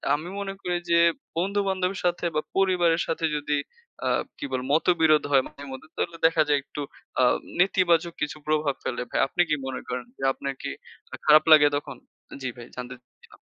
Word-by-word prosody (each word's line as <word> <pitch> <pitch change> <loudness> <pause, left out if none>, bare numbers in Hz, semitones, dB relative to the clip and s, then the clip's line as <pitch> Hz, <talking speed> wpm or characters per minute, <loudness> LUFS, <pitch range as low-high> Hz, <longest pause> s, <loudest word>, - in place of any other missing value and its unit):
আমি 155 +4 -6
মনে 195 -1 -4
করি 180 0 -1
যে, 170 0 +5 0.4
বন্ধু-বান্ধবের 190 0 0
সাথে, 175 0 0
বা 155 - +2 0.2
পরিবারের 175 -3 +3
সাথে, 165 0 -1
যদি 150 0 -1 0.5
আ - - +2 0.3
কি - - -4
বলে? 130 -1 -1
মতবিরোধ 160 -2 +4
হয় 135 -2 +5
মাঝে 140 - -13
মধ্যে, 130 +3 -9
তাহলে 170 - -2
দেখা 165 -1 +2
যায় 145 -1 +3
একটু 145 - -7 0.4
আ - - +5 0.4
নেতিবাচক 175 -2 +3
কিছু 150 0 -2
প্রভাব 155 -2 +1
ফেলে 125 - -3
ভাই। - - -1
আপনি 175 - 0
কি 150 - +3
মনে 130 -1 -4
করেন 125 0 -3
যে, - - -14
আপনার 140 0 -4
কি - - -4 0.4
আ - - -2
খারাপ 155 0 +7
লাগে 155 -1 +9
তখন? 140 -3 -7 0.4
জি, 130 - -3
ভাই 120 - -9
জানতে 125 0 -6
চাচ্ছিলাম। 475 - -22
155 Hz, 185 wpm, -26 LUFS, 140-175 Hz, 0.5 s, লাগে